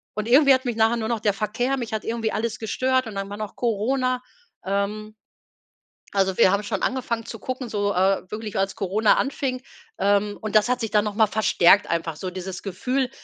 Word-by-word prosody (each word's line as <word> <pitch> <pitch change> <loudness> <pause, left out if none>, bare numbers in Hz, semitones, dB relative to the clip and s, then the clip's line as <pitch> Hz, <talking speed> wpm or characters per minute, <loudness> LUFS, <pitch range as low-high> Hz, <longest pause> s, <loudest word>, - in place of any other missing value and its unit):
und 215 +1 -3
irgendwie 275 +2 +7
hat 260 0 +1
mich 240 -2 -2
nachher 225 +1 +3
nur 220 0 -3
noch 235 - 0
der 205 -2 +1
Verkehr 220 +6 -1
mich 240 -2 -5
hat 215 - -3
irgendwie 225 -1 -1
alles 230 +1 -2
gestört 255 +3 0
und 220 -3 -8
dann 195 0 -4
war 205 - -6
noch 215 -1 -6
Corona. 250 +3 0 0.4
Ähm, 205 +2 -2 1.0
also 190 -2 +1
wir 185 - +6
haben 200 +1 +1
schon 205 - -3
angefangen 235 -3 -1
zu 225 - -8
gucken, 255 +2 -5
so, 205 -1 0
äh, 190 0 +1
wirklich 215 -1 -5
als 195 0 -1
Corona 205 +3 +2
anfing, 265 -2 -2 0.4
ähm, 205 +1 +1
und 215 0 +2
das 210 - +3
hat 250 0 0
sich 225 -2 -3
dann 210 -1 +3
noch 210 -1 -3
mal 220 0 +4
verstärkt 205 -2 +4
einfach 165 -2 -2
so 185 - -4
dieses 185 0 -6
Gefühl: 250 +7 -1
215 Hz, 210 wpm, -24 LUFS, 200-240 Hz, 1.0 s, irgendwie